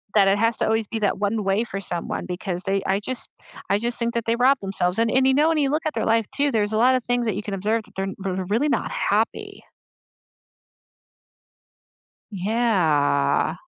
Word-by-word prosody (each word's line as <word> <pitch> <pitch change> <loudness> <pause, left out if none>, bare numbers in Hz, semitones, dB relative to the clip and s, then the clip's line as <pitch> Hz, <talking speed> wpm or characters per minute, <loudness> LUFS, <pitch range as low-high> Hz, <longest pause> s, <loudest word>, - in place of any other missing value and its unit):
that 200 -2 +5
it 195 +1 +3
has 230 +1 +2
to - - 0
always 220 -1 0
be 225 - -4
that 205 -2 0
one 210 +1 -1
way 195 +3 +1
for 195 -3 -5
someone 175 -3 -4
because 180 0 -4
they 195 0 0
I 195 +1 +1
just 255 +4 -4 0.4
I 200 - +3
just 235 +2 -2
think 235 0 -1
that 230 -1 -1
they 230 0 +1
rob 265 +3 +4
themselves, 190 -1 -1
and 230 0 +2
and, 260 0 +3
you 265 - +4
know, 305 +3 +4
when 325 - +1
you 280 - +2
look 305 +3 -1
at 310 - -1
their - - -1
life 225 0 +2
too, 285 +1 +2
there's 215 -2 0
a - - +1
lot 250 +3 +4
of 255 - -1
things 245 0 0
that 210 - 0
you 205 - -4
can 205 - -5
observe 215 +3 -1
that 210 - -21
they're 195 0 -2
they're 190 -1 -3
really 230 +10 +1
not - - -1
happy. - - -1 2.7
Yeah. 180 -9 +1
215 Hz, 215 wpm, -23 LUFS, 195-240 Hz, 2.7 s, that